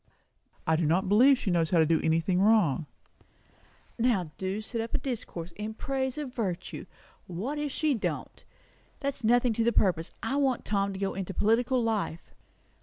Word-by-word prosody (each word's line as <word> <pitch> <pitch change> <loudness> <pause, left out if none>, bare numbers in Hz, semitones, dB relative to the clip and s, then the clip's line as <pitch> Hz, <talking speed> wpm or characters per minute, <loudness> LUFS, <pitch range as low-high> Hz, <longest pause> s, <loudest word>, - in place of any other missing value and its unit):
"I 160 - +3
do 160 -1 +1
not 175 +5 +2
believe 250 +8 +6
she 200 - -2
knows 165 -2 +2
how 175 - +2
to 160 - +5
do 160 +1 +2
anything 165 +3 +2
wrong." 195 - +3 1.1
"Now 210 -9 +1
do 190 +2 -2
set 225 +1 -4
up 225 - -4
a - - +3
discourse 185 -9 -5
in 215 +1 -5
praise 265 +1 -2
of 285 -4 -5
virtue! 185 -7 -4 0.4
What 220 - -4
if 295 -1 -2
she 305 +1 +1
don't? 225 - -4 0.6
That's 280 -3 -3
nothing 245 +1 +3
to 225 - 0
the 235 - +3
purpose. 175 -7 +1
I 265 +5 -1
want 270 -4 +1
Tom 200 -1 0
to - - -6
go 195 -1 -1
into 195 -1 -5
political 240 +3 +2
life." 210 -7 -2
215 Hz, 180 wpm, -28 LUFS, 180-245 Hz, 1.1 s, believe